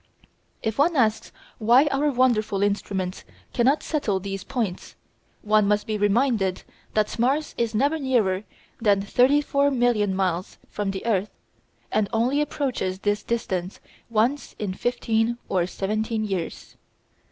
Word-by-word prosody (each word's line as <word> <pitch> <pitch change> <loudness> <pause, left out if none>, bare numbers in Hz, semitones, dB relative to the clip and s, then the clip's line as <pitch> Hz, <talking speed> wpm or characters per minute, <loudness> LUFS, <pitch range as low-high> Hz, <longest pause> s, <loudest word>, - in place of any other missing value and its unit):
If 220 +3 -2
one 325 +4 +3
asks 220 -5 +1 0.3
why 240 +6 +5
our 285 +2 +2
wonderful 235 -6 +2
instruments 195 -2 -2 0.3
cannot 265 +5 +2
settle 225 -11 -1
these 195 0 -5
points, 225 -9 -4 0.5
one 215 -1 +3
must 210 0 +1
be 215 - -2
reminded 205 -2 +1 0.3
that 215 +1 0
Mars 275 +6 +1
is 230 -2 -1
never 285 +7 +2
nearer 220 -9 +1 0.4
than 200 -3 +3
34,000,000 250 -3 +2
miles 185 -2 -1
from 205 -1 -2
the 195 +2 -4
earth, 210 -3 +1 0.6
and 210 -2 +1
only 250 +6 +1
approaches 255 -11 -2
to - - -29
this 205 0 +1
distance 190 -6 -3 0.3
once 235 +6 0
in 200 -3 -3
fifteen 230 +1 0
or 180 -2 +1
seventeen 215 +3 -2
years. 190 -5 -4
215 Hz, 130 wpm, -24 LUFS, 195-250 Hz, 0.6 s, why